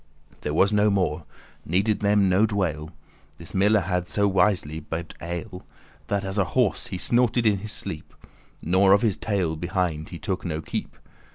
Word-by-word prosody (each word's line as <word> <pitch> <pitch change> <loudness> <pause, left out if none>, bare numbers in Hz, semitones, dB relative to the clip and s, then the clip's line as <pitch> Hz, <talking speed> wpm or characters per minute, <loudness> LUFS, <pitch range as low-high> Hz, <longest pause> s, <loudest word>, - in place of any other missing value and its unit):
There 75 - -3
was 100 +5 +3
no 105 0 +4
more; 85 -6 0 0.4
needed 100 +5 +1
them 105 -1 +3
no 95 +4 +4
dwale.<19> 85 -7 -2 0.5
This 85 - -10
miller 105 +2 +3
had, 90 0 -2
so 100 -1 +2
wisly* 95 -6 +1
bibbed 80 +1 -5
ale, 85 +2 -3
*certainly 95 -5 -11 0.5
That 100 -1 -1
as 95 +2 -2
a - - +4
horse 125 -6 +1
he 95 - -5
snorted 120 +3 +2
in 105 -3 +3
his 105 +2 -6
sleep, 75 -1 -7 0.5
Nor 95 +3 +4
of 100 - +3
his 105 -5 +2
tail 95 -7 -1
behind 85 -2 -2
he 85 - -7
took 95 0 -3
no 80 -3 -3
keep*. 80 - -5
95 Hz, 180 wpm, -25 LUFS, 85-105 Hz, 0.5 s, no